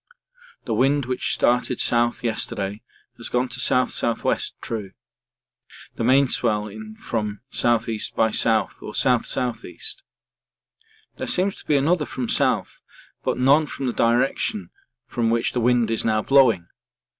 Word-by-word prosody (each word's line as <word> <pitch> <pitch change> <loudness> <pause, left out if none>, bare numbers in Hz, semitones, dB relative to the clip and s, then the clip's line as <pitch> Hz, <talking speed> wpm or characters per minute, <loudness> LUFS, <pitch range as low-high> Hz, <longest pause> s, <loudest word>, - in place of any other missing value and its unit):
The 115 - -2
wind 135 +4 +2
which 125 0 -2
started 125 0 +1
south 120 0 +1
yesterday 105 -3 -2 0.4
has - - -7
gone 125 +1 0
to 120 - -5
S.S.W. 125 -2 +1 0.2
(true), 105 -4 -5 1.0
the - - -4
main 135 +3 +4
swell 105 -4 0
in 110 +1 -10
from 105 -2 -4
S.E. 115 -2 +1 0.2
by 110 - +3
S. - - +1 0.4
or 105 - -8
S.S.E. 125 -1 -1 1.4
There - - -4
seems 185 +2 +1
to - - -14
be 150 - +3
another 155 +3 +1
from 125 -3 -4
south - - 0 0.4
but - - -1
none 140 +5 +4
from 135 - -5
the 125 - -1
direction 115 -5 0 0.3
from 115 -2 -1
which 115 0 +1
the 125 - -1
wind 120 -1 +2
is 115 - 0
now 110 -1 +1
blowing. 125 -10 +4
120 Hz, 140 wpm, -23 LUFS, 110-130 Hz, 1.4 s, main